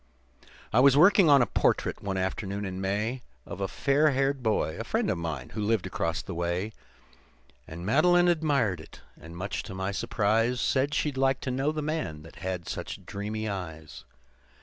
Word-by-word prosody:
"I 115 - +5
was 140 +1 +6
working 180 +1 +6
on 140 -3 +7
a - - +2
portrait, - - 0
one 95 -1 -3
afternoon 100 +2 -2
in 95 0 -5
May, 105 +6 -1 0.2
Of 100 - -7
a 95 - 0
fair 145 +8 +2
haired 135 0 0
boy, 110 -8 0
a - - -2
friend - - 0
of - - -1
mine, 85 -2 -4
who 110 - -5
lived 105 -2 +1
across 85 -3 -2
the 95 - -6
way. 85 +5 -2 1.0
And 85 +2 -8
Madeline 175 - +4
admired 140 - +1
it, - - -14
and 85 +2 -12
much 100 +3 -3
to 95 - -9
my 95 +1 -2
surprise, 115 +4 +1
Said 140 +4 +1
she'd 145 -3 -1
like 135 0 +2
to 130 - -3
know 135 +4 0
the 155 -1 -3
man 145 - -3
that 80 - -14
had 90 -1 -4
such - - -6
dreamy 110 +2 -4
eyes. 80 - -6
105 Hz, 185 wpm, -28 LUFS, 95-135 Hz, 1.0 s, on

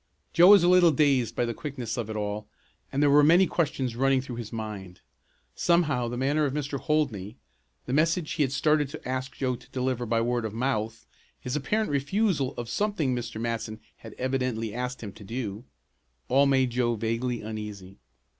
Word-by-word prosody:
Joe 175 +1 +7
was 200 -2 +8
a - - +4
little 180 -1 +6
dazed 140 -5 +2
by 120 - +1
the 115 - -2
quickness 125 -4 -5
of 120 -4 -4
it 110 - -4
all, 105 0 -3 0.4
and 140 +2 +1
there 145 - +5
were 145 +1 +7
many 170 +5 +6
questions 135 -9 -1
running 135 +1 +3
through 125 -2 -6
his 115 -3 -6
mind. 105 -5 -7 0.5
Somehow 150 -8 +2
the 120 +1 -4
manner 145 +4 +1
of 140 0 -2
Mr. 145 -1 -3
Holdney 125 - -1 0.5
the - - -3
message 165 +2 +1
he 155 - -1
had 135 -3 +2
started 150 0 +2
to - - -9
ask 130 0 -3
Joe 130 0 -1
to 125 - -16
deliver 130 -2 -2
by 115 +1 +1
word 120 +1 0
of 110 -1 -4
mouth, 115 -3 -2 0.3
his 125 +2 -4
apparent 210 +8 0
refusal 145 0 0
of 120 - -4
something 160 - 0
Mr. 120 -2 -5
Matson 115 -2 -3 0.2
had 110 -2 -11
evidently 125 -4 -2
asked 125 +1 -4
him 105 -3 -6
to 105 - -13
do 110 0 -5 0.6
all 140 +2 +4
made 130 -2 +2
Joe 120 -1 +1
vaguely 115 +2 -2
uneasy. 105 -3 -7
125 Hz, 190 wpm, -27 LUFS, 115-145 Hz, 0.6 s, was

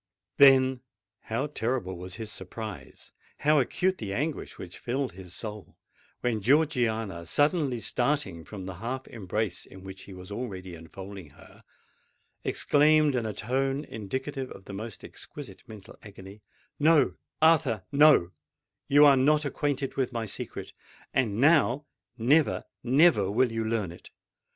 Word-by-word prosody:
Then, 130 -2 +6 0.4
how 115 +5 -1
terrible 120 -8 -2
was 90 +1 -7
his 110 +1 -6
surprise—how 115 +8 -3
acute 185 +8 0
the 100 -3 -4
anguish 150 +4 -3
which - - -9
filled 130 0 -2
his 90 0 -11
soul, 105 -2 -7 0.4
when 115 -3 0
Georgiana, 115 - +1
suddenly 145 - +1
starting 120 - -1
from 95 +3 -8
the 95 -1 -7
half 130 +6 -4
embrace 105 -2 -3
in 95 0 -13
which 95 0 -10
he 95 - -11
was 90 +2 -11
already 95 -6 -5
enfolding 95 +2 -10
her, - - -18 0.8
exclaimed 150 0 +3
in 120 -3 -1
a 105 - -3
tone 135 +6 -1
indicative 130 +5 -5
of 95 - -12
the 100 - -8
most 110 0 -7
exquisite - - -10
mental 105 -3 -11
agony, 100 0 -12 0.4
"No—Arthur—no: 150 - +3 0.6
you 145 +1 +7
are 140 -1 +7
not 150 +3 +3
acquainted 140 -1 -2
with 130 -2 0
my 115 -2 -3
secret—and 105 +2 -5
now, 145 -1 +4 0.3
never, 140 +7 +3 0.2
never 130 - +4
will 120 +4 +2
you 115 0 -2
learn 110 -5 -1
it! 85 - -13
120 Hz, 130 wpm, -28 LUFS, 100-140 Hz, 0.8 s, you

